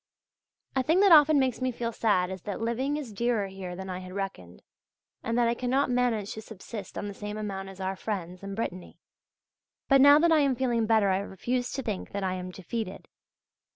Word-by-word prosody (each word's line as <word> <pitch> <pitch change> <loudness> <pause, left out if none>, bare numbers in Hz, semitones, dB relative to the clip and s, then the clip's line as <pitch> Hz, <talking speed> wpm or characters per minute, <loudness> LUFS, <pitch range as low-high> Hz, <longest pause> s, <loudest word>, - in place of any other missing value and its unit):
A 265 - +3
thing 320 +7 +2
that 400 -2 +6
often 305 -1 +8
makes 260 -2 +1
me 255 0 +1
feel 235 -1 -3
sad 190 -5 +1
is 190 -1 -6
that 200 +1 -5
living 250 +6 -1
is 265 -8 -6
dearer 235 -1 0
here 190 -2 -7
than 190 +1 -7
I 185 -1 -4
had 185 0 -9
reckoned, 185 - -6 0.6
and 230 +1 -2
that 240 -1 +3
I 235 - +2
cannot 255 +2 0
manage 240 -5 0
to 220 - -7
subsist 215 -1 -9
on 205 - -3
the 200 - -5
same 210 +1 -6
amount 195 -2 -4
as 195 0 -12
our 190 0 -2
friends 185 -3 -5
in 195 0 -6
Brittany. 185 -5 -5 0.9
But 275 -1 +6
now 285 +1 +9
that 335 +2 +4
I 320 - +5
am 275 -3 +2
feeling 235 -3 0
better 220 -3 +4
I 190 0 +2
refuse 245 +6 -3
to 270 - -3
think 210 -5 -4
that 200 0 -2
I 185 -1 0
am 185 0 -5
defeated. 190 +2 -6
220 Hz, 215 wpm, -28 LUFS, 190-250 Hz, 0.9 s, now